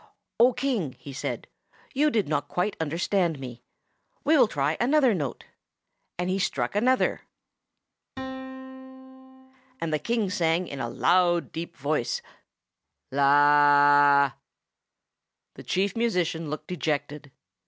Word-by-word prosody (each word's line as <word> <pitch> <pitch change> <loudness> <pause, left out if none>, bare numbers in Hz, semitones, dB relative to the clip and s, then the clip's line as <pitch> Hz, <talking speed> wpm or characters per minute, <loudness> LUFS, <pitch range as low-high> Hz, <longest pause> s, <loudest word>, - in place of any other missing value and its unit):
"O 245 +2 +6
King," 245 - -2
he 140 - -10
said, 135 - -4 0.5
"you 295 +3 +2
did 215 - 0
not 145 -1 -1
quite 185 +3 -2
understand 165 +1 -1
me. 125 -2 -9 0.6
We 310 +3 +3
will 255 -6 +5
try 145 -3 -1
another 265 -1 +3
note." 145 -9 -4 0.7
And 180 +1 -2
he 190 +1 -1
struck 195 - -2
another: 255 +5 +1 0.9
The 260 - -9
King 225 -5 -1
sang, 170 -2 0
in 140 - -7
a 120 -2 -3
loud, 175 +4 +2
deep 165 +1 -7
voice, 140 -3 -2 0.9
The 145 0 +5 1.3
Chief 195 +1 -1
Musician 180 -9 -1
looked 155 - -6
dejected. 150 -3 -3
180 Hz, 110 wpm, -26 LUFS, -, 1.3 s, O